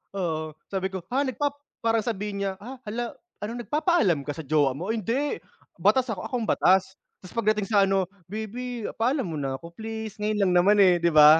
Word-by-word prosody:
Oo, 160 Hz, -4 st, -2 dB, 0.2 s
sabi 190 Hz, 0 st, -2 dB
ko, 190 Hz, -, -3 dB
"Ha, 270 Hz, +3 st, +1 dB
nagpap" 285 Hz, +2 st, -1 dB, 0.3 s
para 225 Hz, -1 st, +2 dB
sabihin 205 Hz, -3 st, -2 dB
niya, 195 Hz, -, 0 dB
"Ah, 245 Hz, +6 st, -8 dB
hala 230 Hz, +2 st, -4 dB, 0.3 s
ano, 225 Hz, +3 st, -4 dB
nagpapaalam 270 Hz, -, +2 dB
ka 145 Hz, -, -2 dB
sa 160 Hz, -, -6 dB
jowa 145 Hz, -3 st, +3 dB
mo?" 180 Hz, +9 st, -3 dB
"Hindi, 230 Hz, +7 st, -1 dB, 0.4 s
batas 255 Hz, -3 st, +3 dB
ako. 195 Hz, -, -4 dB
Ako 255 Hz, -, -4 dB
ang -, -, -3 dB
batas." 190 Hz, +1 st, +3 dB, 0.3 s
Tapos 185 Hz, -, -11 dB
pagdating 215 Hz, -2 st, +2 dB
sa 200 Hz, -2 st, +5 dB
ano, 195 Hz, -1 st, +2 dB, 0.2 s
"Baby, 225 Hz, +3 st, -5 dB
paalam 250 Hz, -, +1 dB
muna 135 Hz, -3 st, -2 dB
ako 170 Hz, +4 st, -10 dB
please. 220 Hz, +2 st, -6 dB
Ngayon 210 Hz, 0 st, 0 dB
lang 185 Hz, -, +2 dB
naman, 195 Hz, +4 st, +5 dB
eh." 180 Hz, -2 st, +5 dB
Di 170 Hz, -, +3 dB
ba? 155 Hz, 0 st, +8 dB
210 Hz, 195 wpm, -26 LUFS, 180-230 Hz, 0.4 s, ba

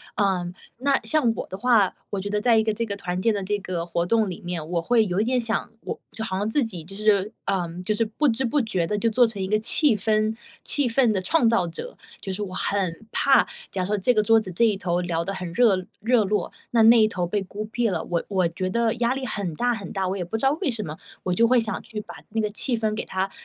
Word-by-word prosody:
嗯， 180 Hz, -3 st, 0 dB, 0.2 s
那 275 Hz, +1 st, +2 dB
像 290 Hz, -8 st, +2 dB
我 -, -, -5 dB
的 190 Hz, -, -7 dB
话， 220 Hz, -4 st, +3 dB, 0.2 s
我 200 Hz, -, -2 dB
觉 205 Hz, -, -4 dB
得 210 Hz, 0 st, 0 dB
在 235 Hz, -1 st, +4 dB
一 -, -, +2 dB
个 220 Hz, -, +1 dB
这 230 Hz, +2 st, -2 dB
个 200 Hz, -2 st, -4 dB
团 180 Hz, -2 st, -3 dB
建 225 Hz, +1 st, +3 dB
的 200 Hz, -1 st, -2 dB
这 205 Hz, +2 st, -1 dB
个 175 Hz, -3 st, -4 dB
活 170 Hz, 0 st, -1 dB
动 220 Hz, +2 st, +2 dB
里 180 Hz, -, -7 dB
面， 170 Hz, -3 st, -5 dB
我 175 Hz, -, +1 dB
会 225 Hz, +4 st, +3 dB
有 180 Hz, +1 st, -1 dB
一 -, -, +2 dB
点 250 Hz, +1 st, +1 dB
想 225 Hz, 0 st, -2 dB
我 -, -, -5 dB
就 220 Hz, -, -5 dB
好 190 Hz, -4 st, -3 dB
像 205 Hz, +2 st, -1 dB
自 280 Hz, +3 st, +2 dB
己 185 Hz, -8 st, -5 dB
就 195 Hz, +4 st, -10 dB
是， 210 Hz, 0 st, +2 dB
嗯， 180 Hz, -2 st, -2 dB
就 210 Hz, +3 st, 0 dB
是 230 Hz, -, +1 dB
不 255 Hz, +7 st, 0 dB
知 245 Hz, +3 st, 0 dB
不 285 Hz, +5 st, +1 dB
觉 185 Hz, -7 st, -1 dB
地 210 Hz, -, -1 dB
就 230 Hz, +2 st, +1 dB
做 245 Hz, +3 st, +4 dB
成 205 Hz, -3 st, -5 dB
一 190 Hz, -, -1 dB
个 215 Hz, +2 st, +2 dB
气 235 Hz, +2 st, +4 dB
氛 215 Hz, +1 st, +1 dB, 0.3 s
气 285 Hz, -3 st, +2 dB
氛 235 Hz, -1 st, +3 dB
的 195 Hz, -, 0 dB
创 240 Hz, -, +2 dB
造 205 Hz, -7 st, +2 dB
者。 170 Hz, -, -7 dB, 0.2 s
就 195 Hz, -, -4 dB
是 205 Hz, -, -3 dB
我 185 Hz, -2 st, -6 dB
很 195 Hz, +1 st, -2 dB
怕 275 Hz, -1 st, +4 dB, 0.2 s
假 190 Hz, -, -2 dB
如 -, -, -3 dB
说 210 Hz, +1 st, 0 dB
这 245 Hz, +6 st, +2 dB
个 215 Hz, -, +3 dB
桌 225 Hz, +1 st, +5 dB
子 205 Hz, -4 st, -5 dB
这 205 Hz, +7 st, +2 dB
一 210 Hz, -3 st, +2 dB
头 175 Hz, -2 st, -1 dB
聊 170 Hz, -1 st, -2 dB
得 195 Hz, -, -3 dB
很 180 Hz, -3 st, -5 dB
热 195 Hz, -5 st, +3 dB, 0.2 s
热 235 Hz, 0 st, +3 dB
络， 210 Hz, +2 st, -1 dB, 0.2 s
那 230 Hz, -2 st, +4 dB
那 230 Hz, 0 st, +7 dB
一 215 Hz, -, +5 dB
头 180 Hz, -5 st, -2 dB
被 205 Hz, +2 st, -1 dB
孤 205 Hz, +3 st, -6 dB
僻 225 Hz, +2 st, -1 dB
了， 170 Hz, -4 st, -2 dB
我 170 Hz, -1 st, -2 dB
我 185 Hz, -4 st, +2 dB
觉 185 Hz, +3 st, -3 dB
得 230 Hz, +2 st, +1 dB
压 240 Hz, +2 st, +1 dB
力 270 Hz, -1 st, -4 dB
很 195 Hz, -8 st, -3 dB
大 245 Hz, +5 st, +1 dB
很 200 Hz, -3 st, -8 dB
大， 190 Hz, -2 st, -1 dB
我 185 Hz, -, -1 dB
也 180 Hz, -, -2 dB
不 220 Hz, -, -3 dB
知 225 Hz, -, -5 dB
道 270 Hz, -, +5 dB
为 325 Hz, -, +1 dB
什 225 Hz, -3 st, -3 dB
么， 155 Hz, 0 st, -6 dB, 0.3 s
我 180 Hz, -, 0 dB
就 230 Hz, +5 st, +4 dB
会 250 Hz, 0 st, +4 dB
想 225 Hz, -1 st, -3 dB
去 220 Hz, -1 st, -6 dB
把 -, -, -11 dB
那 225 Hz, -, -2 dB
个 210 Hz, -, -1 dB
气 235 Hz, +3 st, 0 dB
氛 220 Hz, -1 st, 0 dB
给 -, -, -3 dB
它 190 Hz, +1 st, -2 dB
210 Hz, 300 characters per minute, -24 LUFS, 185-230 Hz, 0.3 s, 那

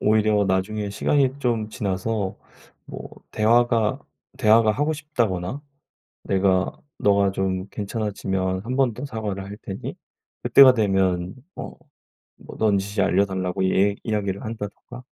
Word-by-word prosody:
오히려 105 Hz, -1 st, +3 dB
나중에 100 Hz, +2 st, -1 dB
시간이 135 Hz, +6 st, +1 dB
좀 115 Hz, -5 st, -1 dB
지나서 100 Hz, 0 st, -2 dB, 0.5 s
뭐 -, -, -8 dB, 0.2 s
대화가, 115 Hz, +1 st, +2 dB, 0.4 s
대화가 110 Hz, -3 st, +5 dB
하고 145 Hz, +6 st, 0 dB
싶다거나 125 Hz, -, -2 dB, 0.6 s
"내가 95 Hz, -1 st, +2 dB, 0.3 s
너가 100 Hz, -1 st, +3 dB
좀 95 Hz, -1 st, -2 dB
괜찮아지면 100 Hz, -3 st, -2 dB
한 125 Hz, +2 st, -3 dB
번 130 Hz, -4 st, +2 dB
더 125 Hz, -, -6 dB
사과를 110 Hz, -7 st, -4 dB
할 100 Hz, +1 st, -8 dB
테니 95 Hz, -2 st, -6 dB, 0.5 s
그때가 135 Hz, -2 st, +8 dB
되면 95 Hz, -4 st, +1 dB, 0.2 s
뭐, -, -, -8 dB, 0.6 s
뭐 -, -, -12 dB
넌지시 100 Hz, -1 st, +1 dB
알려달라."고 95 Hz, -1 st, 0 dB
얘 100 Hz, +1 st, +3 dB
이야기를 100 Hz, -3 st, -2 dB
한다든가. 110 Hz, +3 st, -7 dB
105 Hz, 275 characters per minute, -23 LUFS, 95-115 Hz, 0.6 s, 그때가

